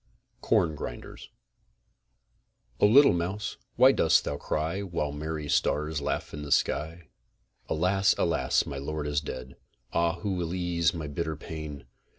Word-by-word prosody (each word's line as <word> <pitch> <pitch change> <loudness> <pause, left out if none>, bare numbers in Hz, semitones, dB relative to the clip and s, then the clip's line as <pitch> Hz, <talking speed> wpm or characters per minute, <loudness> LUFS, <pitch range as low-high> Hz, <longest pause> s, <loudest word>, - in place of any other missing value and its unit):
CORN 80 -2 +2
GRINDERS - - -8 1.5
O - - +6
LITTLE 140 +3 +7
MOUSE, 95 +5 -3 0.2
WHY - - +7
DOST - - +3
THOU 70 - -3
CRY 80 +6 -2
WHILE 85 -6 -2
MERRY 75 +1 -4
STARS 75 +1 0
LAUGH - - -3
IN 75 - -6
THE 75 -1 -7
SKY? 80 +4 0 0.6
Alas! 95 +4 +2
alas! - - +1
my 70 -1 -5
lord 75 +2 -4
is 75 0 0
dead! 65 -3 -7 0.4
Ah, 85 0 +2
who 100 0 -1
will 90 -1 -2
ease 85 -2 +1
my 80 -2 -4
bitter 80 +2 -3
pain? 75 -2 -7
80 Hz, 145 wpm, -28 LUFS, 75-85 Hz, 1.5 s, LITTLE